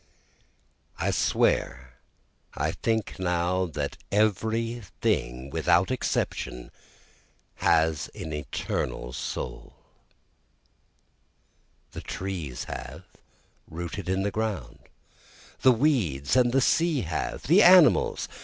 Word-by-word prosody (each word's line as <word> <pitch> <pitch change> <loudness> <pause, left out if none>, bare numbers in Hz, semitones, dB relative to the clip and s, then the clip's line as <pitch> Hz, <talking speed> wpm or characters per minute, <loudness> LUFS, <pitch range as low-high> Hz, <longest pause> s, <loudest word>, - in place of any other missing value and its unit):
9 - - 0
I - - +2
swear 65 -1 0 0.6
I - - 0
think 110 -3 -2
now 90 0 0
that 75 -3 -4
every 110 +3 0 0.2
thing 65 +3 -1
without 85 - +2
exception 65 - -2 0.9
has 80 -2 +2
an 80 - -6
eternal 65 -3 -4
soul! - - -6 2.2
The - - -7
trees 85 -10 -5
have, - - -8 0.7
rooted 85 +3 -6
in 95 +1 0
the 100 - -1
ground! 100 - -3 0.8
the 130 - +7
weeds 110 - +1
of 125 -2 +4
the 135 +2 +3
sea 165 0 +2
have! 80 -3 -3
the 175 +8 +5
animals! 175 - +6
95 Hz, 100 wpm, -26 LUFS, 75-115 Hz, 2.2 s, the